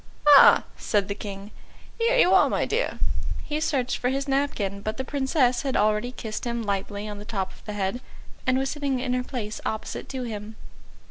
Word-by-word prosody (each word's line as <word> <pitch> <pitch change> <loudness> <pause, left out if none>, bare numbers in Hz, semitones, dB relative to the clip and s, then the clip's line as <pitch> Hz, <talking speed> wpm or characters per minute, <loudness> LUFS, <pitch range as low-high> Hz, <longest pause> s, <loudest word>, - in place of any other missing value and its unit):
"Ah," 285 -2 +9
said 205 -3 0
the 200 - -2
King, 200 0 -8 0.5
"here 470 +2 +3
you 370 -6 +5
are, 380 - +6
my - - 0
dear." - - -1 0.5
He 300 0 -2
searched 270 -5 0
for 250 - 0
his 275 +1 -2
napkin, 250 -8 -1
but 215 +1 -3
the 265 - -2
Princess 265 -2 +1
had 270 -2 -1
already 215 +3 +2
kissed 220 -4 -6
him 235 -1 -2
lightly 200 0 -3
on 205 -1 -6
the - - -8
top 195 -4 -3
of - - -17
the 210 - -5
head, 205 +4 -2 0.5
and 255 0 +3
was 270 0 0
sitting 280 -3 -1
in 250 0 -1
her 250 0 0
place 220 -5 -5
opposite 220 - -4
to 260 -2 -4
him. 215 -2 -6
245 Hz, 200 wpm, -25 LUFS, 210-270 Hz, 0.5 s, Ah